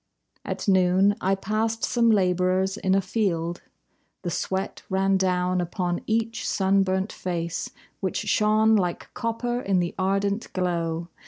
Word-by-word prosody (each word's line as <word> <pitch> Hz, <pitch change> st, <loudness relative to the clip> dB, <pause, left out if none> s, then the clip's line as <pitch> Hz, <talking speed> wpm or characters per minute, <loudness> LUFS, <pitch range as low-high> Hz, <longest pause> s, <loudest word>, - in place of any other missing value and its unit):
At -, -, -4 dB
noon 190 Hz, +1 st, +4 dB
I 195 Hz, +1 st, +2 dB
passed 220 Hz, +3 st, -2 dB
some 235 Hz, -1 st, +3 dB
labourers 185 Hz, -1 st, +2 dB
in 190 Hz, -2 st, +1 dB
a 195 Hz, -, +3 dB
field. 175 Hz, -4 st, -1 dB, 0.6 s
The 175 Hz, -, -2 dB
sweat 190 Hz, +3 st, -3 dB
ran 195 Hz, +1 st, +2 dB
down 180 Hz, -1 st, +1 dB
upon 175 Hz, 0 st, -2 dB
each 225 Hz, +1 st, -1 dB
sunburnt 190 Hz, 0 st, +1 dB
face, 170 Hz, -2 st, -3 dB, 0.3 s
Which -, -, -2 dB
shone 215 Hz, +1 st, +3 dB
like 180 Hz, -4 st, -1 dB
copper 240 Hz, +1 st, -2 dB
in 195 Hz, -4 st, +1 dB
the 175 Hz, -1 st, -1 dB
ardent 195 Hz, +3 st, 0 dB
glow. 170 Hz, -2 st, -1 dB
190 Hz, 135 wpm, -25 LUFS, 180-210 Hz, 0.6 s, noon